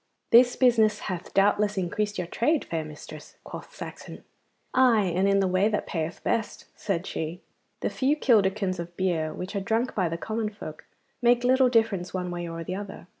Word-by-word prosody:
'This 245 +1 +7
business 225 -4 +3
hath 180 -2 -5
doubtless 205 +1 +2
increased 205 +3 -1
your 180 - -2
trade, 280 - 0
fair 165 -1 -3
mistress,' 155 0 -11
quoth - - -10
Saxon. - - -9 0.5
'Aye, 225 -8 +4
and 190 +2 +2
in 195 0 +3
the 190 - +2
way 185 +3 +2
that 210 - -1
payeth 160 -1 -4
best,' 225 - -2
said 190 -3 -2
she. 160 +2 -4 0.4
'The - - 0
few 275 +3 +1
kilderkins 200 - +2
of 170 0 -7
beer 170 -4 0
which 185 +6 -6
are - - +1
drunk 225 +5 0
by 185 -5 0
the 165 - -3
common 220 +4 -2
folk 180 -7 -10 0.4
make 240 0 +4
little 260 +1 +4
difference 220 -7 +1
one 180 -1 -3
way 175 -1 -4
or 165 0 -5
the 180 - -5
other. 200 -2 -7
195 Hz, 185 wpm, -26 LUFS, 175-225 Hz, 0.5 s, This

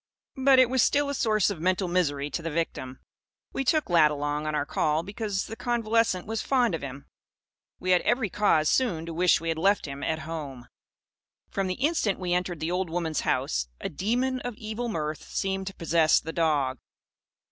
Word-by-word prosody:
But 270 0 +6
it 255 -1 +7
was 260 +1 +2
still 285 +3 +2
a - - -1
source 215 -6 +2
of 185 - -6
mental 185 +2 +1
misery 145 -5 0
to 165 - -3
the 165 - -3
victim. 150 -5 -3 0.5
We 270 - -1
took 305 +4 +2
Lad 165 -4 +5
along, 145 +1 -2
on 155 - -1
our 145 - 0
call, 155 +2 0
because 200 0 -3
the 225 - -7
convalescent 230 -5 +1
was 220 0 -3
fond 250 -7 +2
of 165 - -2
him. 140 0 -7 0.7
We 185 - -1
had 180 - +5
every 230 -3 +1
cause, 165 -7 +3
soon, 175 - +1
to 165 - -6
wish 175 +2 +3
we 165 - -4
had 160 -1 -1
left 200 +4 +2
him 140 -1 -7
at 160 - -1
home. 140 -7 -6 0.8
From 195 -1 -1
the 185 - -2
instant 280 - +1
we 180 -1 -2
entered 180 -2 -1
the 160 +2 -1
old 180 -1 -1
woman's 165 -2 -1
house, - - 0
a - - -4
demon 245 - -1
of 245 -2 -5
evil 220 +2 -4
mirth 155 -6 -3
seemed 190 0 -2
to 195 - -6
possess 165 -1 +3
the 160 - -7
dog. 145 -6 +1
180 Hz, 200 wpm, -27 LUFS, 155-220 Hz, 0.8 s, it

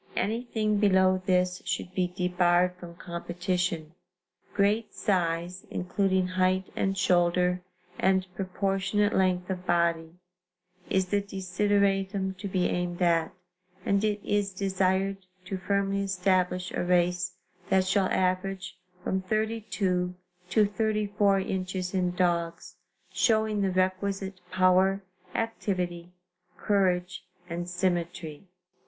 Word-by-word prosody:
Anything 215 -1 0
below 190 -2 +4
this 180 -1 +2
should 180 - -3
be 185 -1 +1
debarred 180 0 +2
from 175 -1 -10
competition. 175 -1 -3 0.6
Great 210 +3 +1
size, 175 -1 -1
including 190 0 0
height 185 +1 +1
and 195 0 0
shoulder 180 0 +2 0.4
and 190 0 +3
proportionate 195 +2 0
length 185 -1 +2
of 180 -1 -4
body 170 -1 +1 0.7
is 190 -1 +1
the 205 +1 +2
desideratum 195 0 0
to 200 - -5
be 185 -2 0
aimed 175 0 -1
at, 165 -2 +2 0.5
and 200 +1 +2
it 210 -1 +1
is 205 -1 +1
desired 190 0 0 0.3
to 190 0 -4
firmly 200 0 0
establish 185 -1 0
a - - -1
race 180 0 +1 0.3
that 190 -1 +3
shall 190 0 +2
average 185 0 -1 0.2
from 190 - 0
32 200 -3 -1 0.3
to 210 +3 +4
34 205 -1 +1
inches 185 -1 -3
in 180 -2 0
dogs, 175 0 -1 0.4
showing 215 +2 +2
the 195 - +2
requisite 190 +1 -1
power, 185 +1 +3 0.3
activity, 180 -6 -2 0.5
courage 185 -3 +1 0.2
and 175 0 -4
symmetry." 175 -2 -2
185 Hz, 110 wpm, -28 LUFS, 180-195 Hz, 0.7 s, below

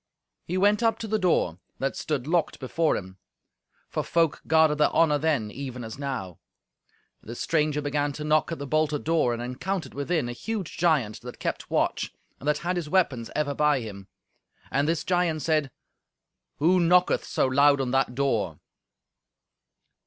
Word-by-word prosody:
He 180 - -2
went 205 +3 +3
up 225 -1 +2
to 225 - -5
the 215 0 0
door, 125 - +1 0.2
that 135 - -2
stood 145 -5 -2
locked 165 +2 0
before 155 +5 +1
him. 95 0 -9 0.7
For - - -2
folk 165 -3 +1
guarded 160 -1 +4
their 150 - +5
honour 150 -3 +3
then, 140 -9 0
even 130 -2 -6
as 110 +3 -8
now. 130 - -4 0.8
The 115 - -8
stranger 150 +1 0
began 145 0 0
to 150 - -6
knock 155 +2 +2
at 165 - -3
the 140 - -5
bolted 155 0 0
door, 160 -6 +2
and 120 0 -3
encountered 140 +5 -4
within 145 0 -1
a - - -3
huge 205 - -4
giant 150 -11 +1
that - - -9
kept - - -4
watch, - - 0 0.3
and 140 - -8
that 150 0 +3
had 180 +1 0
his 165 -4 -3
weapons 140 -10 +1
ever 150 -2 0
by 150 -1 +2
him. 100 -3 -8 0.6
And 140 +2 +1
this 165 0 0
giant 175 -4 0
said, 155 -3 +1 0.9
"Who 175 +5 +4
knocketh 180 +1 +3
so - - 0
loud 140 +2 +4
on 130 -2 -1
that 135 -1 +1
door?" 110 - 0
150 Hz, 170 wpm, -26 LUFS, 130-165 Hz, 0.9 s, their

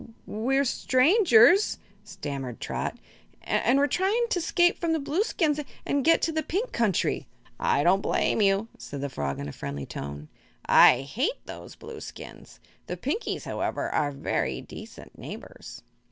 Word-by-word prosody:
"W 225 - -15
we're 270 +6 0
strangers," 280 - +4 0.3
stammered 135 -4 -6
Trot; - - -3 0.5
"an' 245 +4 +2
we're 280 - +4
tryin' 410 +9 +1
to 360 - 0
'scape 350 +1 +2
from 335 -1 0
the 320 - +1
Blueskins 305 0 0 0.3
an' 285 - +1
get 330 +5 +4
into - - -2
the 315 0 -1
Pink 385 +10 -2
Country." 220 -6 0 0.3
"I 140 - +2
don't 190 +4 +4
blame 220 - +1
you," 200 +2 +2
said 140 -1 -7
the 140 - -3
frog, 70 - -3
in 70 - -5
a - - -5
friendly 70 0 -5
tone. 70 +1 -7 0.4
"I 125 - +7
hate 255 - -3
those - - -9
Blueskins. - - -10 0.3
The - - -4
Pinkies, 455 - -3
however, - - -3
are 145 -1 +1
very 140 - -2
decent - - -11
neighbors." - - -10
255 Hz, 155 wpm, -27 LUFS, -, 0.5 s, I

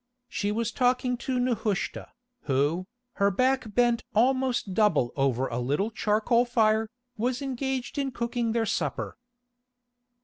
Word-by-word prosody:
She 205 -3 -2
was 225 +1 -1
talking 250 0 +1
to 255 +1 -2
Nehushta, 225 -5 -1 0.4
who, 145 +6 +1 0.3
her 200 0 +4
back 255 +1 0
bent 240 -1 +3
almost 255 -3 +2
double 170 - +2
over 135 -2 +1
a 120 - -3
little 145 - 0
charcoal 220 +3 +2
fire, 220 -2 +2 0.3
was 245 +3 0
engaged 265 0 -3
in 275 -1 0
cooking 235 -1 -1
their 230 0 +1
supper. 215 - -2
230 Hz, 130 wpm, -27 LUFS, 200-250 Hz, 0.4 s, her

